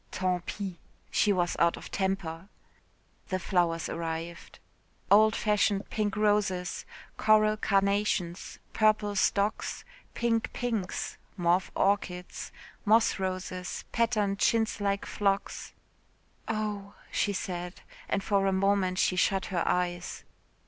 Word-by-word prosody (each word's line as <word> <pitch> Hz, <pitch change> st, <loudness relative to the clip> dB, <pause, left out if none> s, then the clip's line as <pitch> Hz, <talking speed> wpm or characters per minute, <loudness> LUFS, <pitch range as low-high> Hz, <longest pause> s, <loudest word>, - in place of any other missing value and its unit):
"Tant 180 Hz, -2 st, -1 dB
pis." 195 Hz, -3 st, -4 dB, 0.4 s
She 210 Hz, -, +3 dB
was 175 Hz, -2 st, +1 dB
out 170 Hz, 0 st, +3 dB
of -, -, -10 dB
temper. 190 Hz, -2 st, -2 dB, 0.8 s
The 185 Hz, -, -1 dB
flowers 170 Hz, -3 st, 0 dB
arrived. 165 Hz, +1 st, -5 dB, 0.5 s
Old 215 Hz, +2 st, +6 dB
fashioned 210 Hz, -1 st, +1 dB
pink 210 Hz, -2 st, -1 dB
roses, 205 Hz, -4 st, +1 dB, 0.3 s
coral 215 Hz, 0 st, +4 dB
carnations, 200 Hz, -3 st, 0 dB, 0.2 s
purple 215 Hz, -1 st, +2 dB
stocks, 200 Hz, +2 st, 0 dB, 0.3 s
pink 230 Hz, -1 st, 0 dB
pinks, 225 Hz, -7 st, -2 dB, 0.2 s
mauve 175 Hz, +1 st, +2 dB
orchids, 185 Hz, -3 st, -1 dB, 0.3 s
moss 220 Hz, -1 st, +4 dB
roses, 185 Hz, -1 st, -4 dB
patterned 215 Hz, -4 st, +1 dB
chintz 225 Hz, -1 st, +2 dB
like 200 Hz, 0 st, 0 dB
phlox. 200 Hz, -1 st, -1 dB, 0.8 s
"Oh!" 210 Hz, -2 st, -3 dB, 0.2 s
she 205 Hz, -, +1 dB
said, 180 Hz, -2 st, -4 dB, 0.3 s
and 200 Hz, -, 0 dB
for 200 Hz, -2 st, +2 dB
a -, -, +3 dB
moment 190 Hz, -1 st, +2 dB
she 185 Hz, -, +2 dB
shut 190 Hz, +1 st, +2 dB
her 175 Hz, -, +1 dB
eyes. 175 Hz, -1 st, -1 dB
195 Hz, 115 wpm, -29 LUFS, 180-210 Hz, 0.8 s, Old